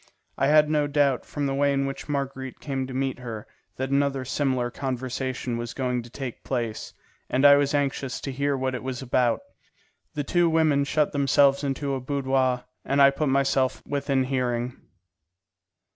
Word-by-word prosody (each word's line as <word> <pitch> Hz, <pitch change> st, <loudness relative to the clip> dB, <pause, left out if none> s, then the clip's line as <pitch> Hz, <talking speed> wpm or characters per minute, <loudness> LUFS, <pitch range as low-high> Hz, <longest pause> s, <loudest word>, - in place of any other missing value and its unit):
I 135 Hz, -, +1 dB
had 150 Hz, +1 st, +5 dB
no 150 Hz, -1 st, +1 dB
doubt, 140 Hz, -3 st, +1 dB
from 145 Hz, -1 st, -3 dB
the 135 Hz, -, 0 dB
way 140 Hz, +1 st, +2 dB
in 140 Hz, 0 st, +1 dB
which 135 Hz, +2 st, -6 dB
Marguerite 135 Hz, -2 st, -3 dB
came 135 Hz, -3 st, -3 dB
to 130 Hz, -, -7 dB
meet 135 Hz, -1 st, -1 dB
her, 115 Hz, -4 st, -6 dB, 0.3 s
that 130 Hz, +1 st, -3 dB
another 140 Hz, -1 st, +1 dB
similar 130 Hz, -3 st, 0 dB
conversation 130 Hz, -1 st, -3 dB
was 120 Hz, 0 st, -5 dB
going 125 Hz, -2 st, -1 dB
to 120 Hz, -, -12 dB
take 130 Hz, -1 st, -7 dB
place, 120 Hz, -4 st, -3 dB, 0.3 s
and 130 Hz, +2 st, +2 dB
I 140 Hz, 0 st, +9 dB
was 145 Hz, 0 st, +1 dB
anxious 140 Hz, -2 st, -1 dB
to 135 Hz, -, -4 dB
hear 140 Hz, +1 st, 0 dB
what 130 Hz, 0 st, -1 dB
it 125 Hz, -, -4 dB
was 130 Hz, +1 st, -4 dB
about. 125 Hz, -, +1 dB, 0.7 s
The 145 Hz, -, -1 dB
two 175 Hz, +3 st, +2 dB
women 155 Hz, -3 st, +3 dB
shut 150 Hz, +1 st, +1 dB
themselves 140 Hz, 0 st, +3 dB
into 140 Hz, 0 st, -2 dB
a 135 Hz, -, -2 dB
boudoir, 130 Hz, -2 st, 0 dB, 0.2 s
and 140 Hz, -, 0 dB
I 140 Hz, 0 st, +8 dB
put 145 Hz, +1 st, -1 dB
myself 135 Hz, -1 st, +1 dB
within 140 Hz, -2 st, 0 dB
hearing. 125 Hz, -2 st, -1 dB
135 Hz, 175 wpm, -25 LUFS, 130-140 Hz, 0.7 s, I